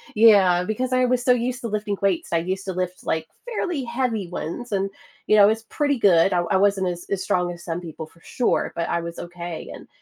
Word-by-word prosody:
Yeah, 200 -5 +6
because 250 +6 -2
I 255 0 +3
was 245 0 +1
so 250 - +4
used 245 +1 0
to 235 - -3
lifting 210 -1 -2
weights. 190 -3 0
I 170 - +3
used 190 +3 -3
to 190 - -3
lift, 185 0 -4
like, 160 0 -1 0.2
fairly 355 - -2
heavy 235 -5 -1
ones, 180 +7 -6
and, 195 0 0 0.4
you 215 - +5
know, 205 - +8
I - - +9
was 220 +1 +1
pretty 285 +3 0
good. 190 -3 +4
I 175 - +2
I 190 - +4
wasn't 195 -1 +2
as 175 0 -6
as 195 -1 -1
strong 180 -1 0
as 170 - -12
some 170 0 -3
people 160 -2 -7
for 165 - -22
sure, 245 - 0
but 170 - -2
I 170 - +1
was 170 0 -7
okay 175 -1 -7
and - - -12
195 Hz, 240 wpm, -23 LUFS, 175-235 Hz, 0.4 s, I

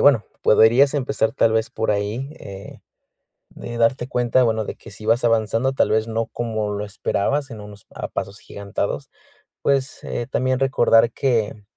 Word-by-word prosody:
bueno, 135 -7 +5 0.2
podrías 120 +7 +5
empezar, 130 -5 0
tal 115 -4 +2
vez, 110 0 0
por 110 - -1
ahí, 105 +7 -2
eh, 100 0 -10 0.7
de 120 0 -8
darte 120 +2 +1
cuenta, 125 0 +2
bueno, 110 -2 0
de - - -6
que - - -14
sí 110 - -11
vas 115 +2 +2
avanzando, 115 +3 +1
tal - - +2
vez, 110 +1 +1
no 115 0 -2
como 110 -3 -3
lo 105 +1 -3
esperabas, 135 +7 -1
en 110 - -8
unos, 105 -1 -12
ah, - - -4
pasos 100 +2 -5
agigantados, 100 -1 -4 0.5
pues, 135 -1 0
eh, 120 0 -4
también 130 0 0
recordar 120 -3 +4
que, 115 -6 0
mm, 105 - -18
115 Hz, 175 wpm, -22 LUFS, 110-130 Hz, 0.7 s, bueno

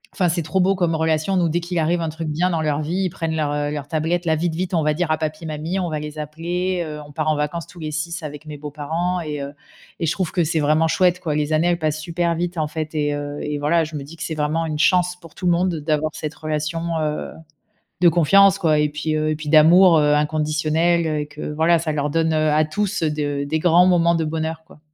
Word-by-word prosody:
enfin 180 -4 +2
c'est 170 +1 0
trop 160 +5 -1
beau 190 +2 +3
comme 175 -3 0
relation. 160 +4 +1
Nous 170 -2 +2
dès 170 - 0
qu'il 175 0 -3
arrive 170 +2 +1
un 165 - -1
truc 160 +1 -5
bien 170 +5 +1
dans 165 -2 0
leur 150 -1 0
vie, 175 +6 -1
ils - - 0
prennent 165 -1 -3
leur, 150 -2 0
heu, 145 0 -1
leur 145 -1 -5
tablette, 165 +3 -1
là: 160 -1 +2
«Vite, 170 +1 -1
vite 180 +2 -3
on 160 - +2
va 150 0 +2
dire 175 0 -1
à 155 - +2
papi 155 +1 -4
mamie, 155 +5 -3
on 180 -2 -2
va 155 -1 -3
les 150 0 -7
appeler» 175 +4 -2
heu, 150 -1 -6
on 145 - -14
part 155 +1 -1
en 155 - +2
vacances 150 +3 -2
tous 180 -4 -14
les 155 -1 -4
6 170 +3 -4
avec 150 0 -7
mes 150 -1 -8
beaux-parents 155 +5 -3
et 150 -3 -4
heu, 140 +1 -6 0.5
et - - -1
je 155 - +2
trouve 185 -3 -2
que 175 - +1
c'est 160 +1 0
vraiment 155 +2 +3
chouette 180 +2 +2
quoi. 160 -4 -2
Les 150 0 -1
années 155 +2 +2
elles 175 -1 +1
passent 155 -1 -1
super 170 +1 -1
vite 175 +1 -3
en 155 - 0
fait 155 +1 -5
et 145 -1 0
heu 145 0 -5
et 150 0 -3
voilà 165 +3 +2
je 155 - -9
me 145 - -4
dis 155 +4 -12
c'est 160 0 -4
vraiment 155 +2 0
une 155 -1 -3
chance 180 +1 +3
pour 165 -2 -14
tout - - -6
le - - +5
monde 175 0 +1
d'avoir 155 0 -1
cette 155 0 -5
relation, 155 +1 -3 0.2
heu, 150 -1 -3 0.7
de 175 - +7
confiance 195 +4 +5
quoi 155 -5 +2
et 150 0 +2
puis 155 +1 -2
heu, 155 0 0
et 155 - 0
puis 150 -1 -6
d'amour, 165 +3 +7
heu, 150 0 +3
inconditionnel, 155 +3 +1
heu 155 -1 -1
et 150 - -5
que 150 0 -7
voilà, 160 +3 +3
ça 160 -1 -2
leur 150 -1 -1
donne, 160 +1 +1
heu, 155 0 +2
à 155 +1 +3
tous, 200 +4 -2
heu, 155 - +1
de 145 -1 -2
des 160 +2 -1
grands 175 +2 +5
moments 170 -1 +3
de 165 -1 0
bonheur 160 +1 -3
quoi. 160 - -18
160 Hz, 270 wpm, -21 LUFS, 150-170 Hz, 0.7 s, de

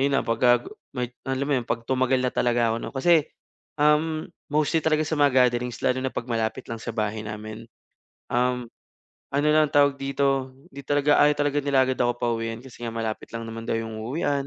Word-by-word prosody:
ayun 140 0 +2
na - - +1
pagka 120 +1 +3 0.3
may 125 -1 -2 0.2
alam 135 +1 0
mo - - +3
'yon 120 - -10
pag 115 - -1
tumagal 130 +1 +1
na 125 - +1
talaga 120 -1 +2
ako - - -1
'no. - - -6
Kasi, 155 +3 +4 0.5
um, 155 +1 +3 0.2
mostly 150 +2 +1
talaga 155 -1 +1
sa 155 0 -2
mga 130 -3 +5
gatherings 120 -1 -4
lalo 125 0 +2
na 130 0 -3
'pag 120 0 -5
malapit 115 +2 -2
lang 115 - -4
sa 115 0 -6
bahay 110 -1 -2
namin, 110 +2 -7 0.6
um, 125 0 +1 0.7
ano 145 +2 +1
lang 155 0 +5
tawag 145 -1 +4
dito, 135 -1 0 0.2
hindi 140 +1 -9
talaga, 145 0 +3
ayaw 150 - +4
talaga 145 0 +1
nila 140 -1 +3
agad 130 0 -2
ako 120 0 +2
pauwiin 115 0 -2
kasi 120 -2 -10
nga 115 - -5
malapit 110 -1 -4
lang 115 0 -4
naman 115 0 -7
daw - - 0
'yong 110 -1 -4
uuwian 140 +3 -1
130 Hz, 205 wpm, -25 LUFS, 115-145 Hz, 0.7 s, mga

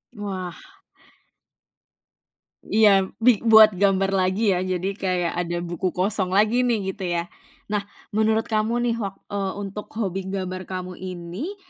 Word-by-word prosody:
Wah. 190 -4 -5 2.1
iya, 200 -3 +5 0.2
bi 240 -4 +5
buat 220 -2 +7
gambar 195 -1 +3
lagi, 195 +2 +2
ya 180 - +1
jadi 185 +1 -1
kayak 180 -3 -1
ada 175 0 -2
buku 175 +1 -2
kosong 190 0 0
lagi 220 +5 +3
nih, 205 -5 0
gitu 195 0 -9
ya. 170 -1 0 0.5
Nah 210 -1 0 0.3
menurut 220 +1 +2
kamu 220 +2 +1
nih 230 - 0
wak 195 -3 -4 0.2
eee, 195 -2 -1
untuk 200 +1 -6
hobi 195 -3 -2
gambar 185 -1 -4
kamu 185 -1 -5
ini, 185 - -6
195 Hz, 140 wpm, -23 LUFS, 185-215 Hz, 2.1 s, buat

